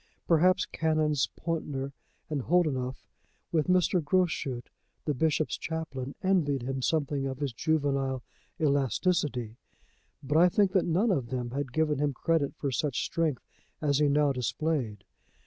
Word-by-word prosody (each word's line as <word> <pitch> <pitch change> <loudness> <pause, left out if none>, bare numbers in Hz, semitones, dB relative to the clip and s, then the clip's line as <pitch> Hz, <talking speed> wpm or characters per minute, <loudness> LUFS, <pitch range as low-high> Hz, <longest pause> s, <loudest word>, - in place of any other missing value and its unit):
Perhaps 180 +3 +4
Canons 155 -3 +1
Pountner 145 -5 -3 0.4
and 150 -3 -2
Holdenough, 130 -6 0 0.5
with 155 -3 +1
Mr. 180 -1 +3
Groschut, 145 -7 0 0.3
the 150 - +1
bishop's 155 +2 0
chaplain, 145 -5 -4
envied 155 -9 +2
him 135 +1 -3
something 145 -1 0
of 130 -1 -4
his 140 -3 -2
juvenile 140 -3 0 0.4
elasticity. 140 - +1 0.7
But 145 +4 +2
I 180 +1 +7
think 200 +1 +3
that 190 -3 +2
none 185 +7 +2
of 130 -10 -1
them 125 -1 -3
had 135 -1 -3
given 150 0 +1
him 145 -1 +1
credit 150 +1 0
for 140 - -2
such 140 +1 -1
strength 160 -6 -1 0.4
as 145 -2 +1
he 150 - +4
now 145 0 +3
displayed. 125 -4 -2
145 Hz, 140 wpm, -29 LUFS, 135-160 Hz, 0.7 s, I